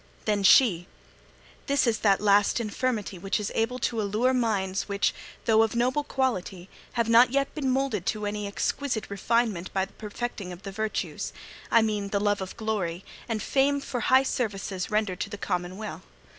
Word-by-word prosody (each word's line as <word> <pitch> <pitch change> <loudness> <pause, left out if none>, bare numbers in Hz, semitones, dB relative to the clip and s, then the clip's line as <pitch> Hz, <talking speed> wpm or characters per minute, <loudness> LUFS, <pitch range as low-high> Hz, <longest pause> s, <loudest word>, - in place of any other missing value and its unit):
Then 210 -2 +1
she: 190 -4 +5 0.8
'This 280 -1 +2
is 225 -3 +1
that 200 -2 +3
"last 205 +2 +3
infirmity" 215 -3 -2
which 195 +4 -1
is 210 - -3
able 230 +3 0
to 235 -2 -1
allure 215 +6 +1
minds 205 -6 0
which, 200 0 +1 0.3
though 220 -1 +5
of 225 +1 +1
noble 255 +5 +1
quality, 195 -10 -2 0.2
have 235 -2 0
not 235 +2 +6
yet 275 +2 0
been 280 -4 -1
moulded 260 -8 0
to 210 -1 -1
any 205 0 -3
exquisite 225 +2 -2
refinement 205 -2 0
by 190 -1 +1
the - - -21
perfecting 210 -3 -5
of 180 +2 -10
the 195 - -6
virtues 215 +2 -3 0.4
I 230 - +5
mean, 210 -2 -1
the 200 0 0
love 205 -1 +1
of 190 - -6
glory 195 -6 -2 0.2
and 220 -2 -2
fame 280 +1 +2
for 270 -2 -4
high 260 +3 +4
services 200 -7 -2
rendered 210 -4 0
to - - -3
the 205 - -6
commonweal. 185 +2 -4
215 Hz, 175 wpm, -27 LUFS, 195-240 Hz, 0.8 s, not